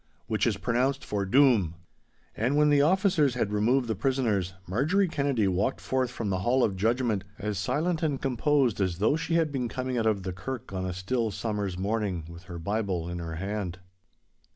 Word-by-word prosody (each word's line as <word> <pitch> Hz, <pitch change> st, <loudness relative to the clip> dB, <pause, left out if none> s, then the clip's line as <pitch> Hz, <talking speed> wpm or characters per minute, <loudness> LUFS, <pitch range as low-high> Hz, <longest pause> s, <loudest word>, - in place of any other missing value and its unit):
Which 110 Hz, 0 st, 0 dB
is 110 Hz, -4 st, 0 dB
pronounced 125 Hz, +7 st, 0 dB
for 100 Hz, -2 st, -2 dB
DOOM!' 115 Hz, -, +4 dB, 0.6 s
And 125 Hz, +6 st, 0 dB
when 150 Hz, 0 st, +4 dB
the 145 Hz, -1 st, +5 dB
officers 165 Hz, -, +3 dB
had 105 Hz, -4 st, -1 dB
removed 120 Hz, +5 st, +2 dB
the 110 Hz, -, 0 dB
prisoners, 105 Hz, -5 st, 0 dB
Marjorie 155 Hz, -, +2 dB
Kennedy 140 Hz, -, +1 dB
walked 95 Hz, +7 st, 0 dB
forth 130 Hz, -1 st, 0 dB
from 115 Hz, -4 st, -3 dB
the 95 Hz, -, 0 dB
hall 120 Hz, +7 st, +2 dB
of 100 Hz, -, +1 dB
judgment, 110 Hz, 0 st, +1 dB
as 105 Hz, -2 st, -3 dB
silent 160 Hz, -, 0 dB
and 145 Hz, -5 st, 0 dB
composed 135 Hz, -3 st, +1 dB
as 90 Hz, -3 st, 0 dB
though 110 Hz, +9 st, +3 dB
she 165 Hz, +1 st, -1 dB
had 165 Hz, -3 st, +2 dB
been 130 Hz, -3 st, -1 dB
coming 130 Hz, +1 st, -2 dB
out 110 Hz, -, +1 dB
of 100 Hz, -3 st, +1 dB
the 95 Hz, 0 st, -3 dB
kirk 120 Hz, +4 st, -6 dB
on 95 Hz, 0 st, -2 dB
a 90 Hz, -, -3 dB
still 110 Hz, +5 st, -1 dB
summer's 105 Hz, -3 st, -3 dB
morning 100 Hz, -4 st, -1 dB
with 85 Hz, +1 st, -11 dB
her 90 Hz, -1 st, -7 dB
Bible 95 Hz, -1 st, -2 dB
in 85 Hz, 0 st, -4 dB
her 80 Hz, -1 st, -5 dB
hand. 95 Hz, 0 st, -3 dB
110 Hz, 195 wpm, -28 LUFS, 95-135 Hz, 0.6 s, the